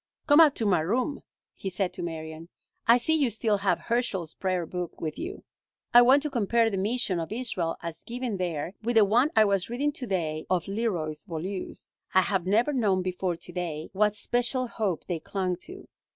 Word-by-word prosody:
"Come 290 0 +6
up 310 -4 +7
to 225 - -1
my 185 -5 +3
room," 245 - -1 0.3
he 195 - -5
said 185 0 -1
to - - -7
Marion. 160 -1 -6 0.4
"I 235 +1 +8
see 285 +6 +1
you 290 -5 +3
still 220 -1 +1
have 200 0 +1
Herschel's 210 -9 -1
prayer 185 -3 -1
book 180 +1 -5
with 155 -2 -4
you. 370 +5 -6 0.5
I 240 - +10
want 265 +4 +5
to 300 - -1
compare 230 -1 +2
the 195 - -2
mission 205 -2 0
of 165 +2 -5
Israel 215 -8 -2
as 170 -1 -6
given 240 -3 -4
there 175 -2 -3
with 235 +2 -1
the 220 -2 +7
one 240 +8 +3
I 220 -1 +6
was 200 -1 0
reading 275 +5 0
to 265 -3 -6
day 160 -5 -2
of 180 -3 0
Leroy 195 -7 -1
Beaulieu's. 180 +3 -6 0.2
I 190 - +7
have 190 -2 -1
never 230 +9 +3
known 200 -8 +2
before 180 -1 -2
to 175 - -10
day 170 -3 -4
what 210 +1 +2
special 245 +3 0
hope 210 -7 -2
they 175 -3 -3
clung 185 +1 -2
to. 380 +2 -11
200 Hz, 200 wpm, -27 LUFS, 180-240 Hz, 0.5 s, I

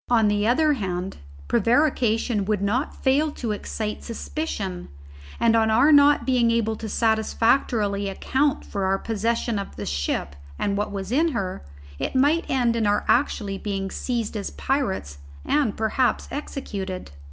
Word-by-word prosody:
On 225 -3 +4
the 205 +1 +1
other 300 +5 +3
hand 190 -6 -3 0.3
prevarication 230 - +2
would 205 -1 0
not 240 +8 -1
fail 285 +3 +3
to 230 -3 -3
excite 210 +1 -4
suspicion, 220 - -4 0.5
and 230 -1 +4
on 220 -1 +3
our 245 +8 +5
not 285 -3 +6
being 245 -2 +3
able 225 -1 +1
to 220 - -6
satisfactorily 220 -2 +1
account 270 +8 0
for 200 -2 -3
our 190 +1 +2
possession 230 +1 -1
of 200 - -7
the 105 - -5
ship 70 0 -2 0.2
and 200 - -1
what 205 +1 -2
was 195 0 -5
in 315 +4 +2
her, 190 - -3 0.4
it - - -3
might 290 +6 +2
end 245 -3 +2
in 225 -2 +1
our 205 0 +1
actually 205 -7 +1
being 195 -2 -3
seized 235 -3 -3
as 205 -2 -3
pirates 195 - -2 0.3
and 285 -8 +1
perhaps 220 +3 +1
executed. 195 - -5
225 Hz, 150 wpm, -24 LUFS, 200-260 Hz, 0.5 s, not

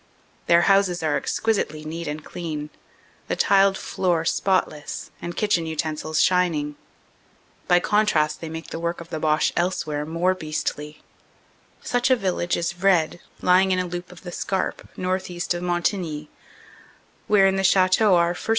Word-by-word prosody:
Their 170 0 +5
houses 195 -3 +3
are 155 -2 +1
exquisitely 175 -9 -1
neat 165 +1 -5
and 150 +1 -5
clean, 155 -3 -5 0.6
the - - -1
tiled 195 -1 +4
floor 175 -3 -1
spotless 165 -4 -1
and 175 0 -6
kitchen 180 -6 +1
utensils 155 0 -1
shining. 165 -5 +1 0.9
By 175 - +5
contrast 175 -9 +1
they 165 - -5
make 160 0 -7
the - - -4
work 170 +1 -2
of 170 0 -10
the 155 - -4
Boche 155 0 +2
else 180 +1 0
where 150 -1 -3
more 170 +3 +1
beastly. 155 -3 -4 0.8
Such 245 +1 +1
a 260 - +6
village 185 -5 -1
is 170 0 -1
Vred, 175 -2 +2 0.2
lying 185 +1 +4
in 185 - +2
a 185 - 0
loop 175 +1 -6
of 180 - -13
the 175 - -7
Scarpe, 190 +1 -3
northeast 185 -1 -2
of 175 - -4
Montigny, 175 -3 -2 1.0
where 205 -2 +5
in 195 0 +3
the 195 - 0
chateau 190 +2 +4
our 170 0 +3
1st. 180 - -9
175 Hz, 160 wpm, -23 LUFS, 160-185 Hz, 1.0 s, a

